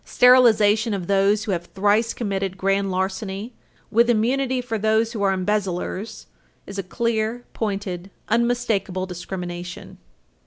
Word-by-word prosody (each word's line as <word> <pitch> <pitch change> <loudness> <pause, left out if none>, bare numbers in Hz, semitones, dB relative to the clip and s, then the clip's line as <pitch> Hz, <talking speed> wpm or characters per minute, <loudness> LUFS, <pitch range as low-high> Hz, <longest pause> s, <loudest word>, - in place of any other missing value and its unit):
Sterilization 225 -3 +5
of 185 -3 -4
those 200 +2 +2
who 220 - -3
have 175 -2 -2
thrice 210 +5 +1
committed 195 -4 -2
grand 195 +1 +1
larceny, 190 +4 -3 0.4
with 235 +2 +4
immunity 255 +3 +1
for 230 -3 -3
those 220 +2 +1
who 215 - -4
are 195 -1 +3
embezzlers, 190 +1 -2 0.4
is 200 0 -7
a - - +1
clear, 230 +4 -2
pointed, 195 -4 -3 0.2
unmistakable 225 -5 0
discrimination. 180 -1 -7
205 Hz, 125 wpm, -23 LUFS, 190-230 Hz, 0.4 s, Sterilization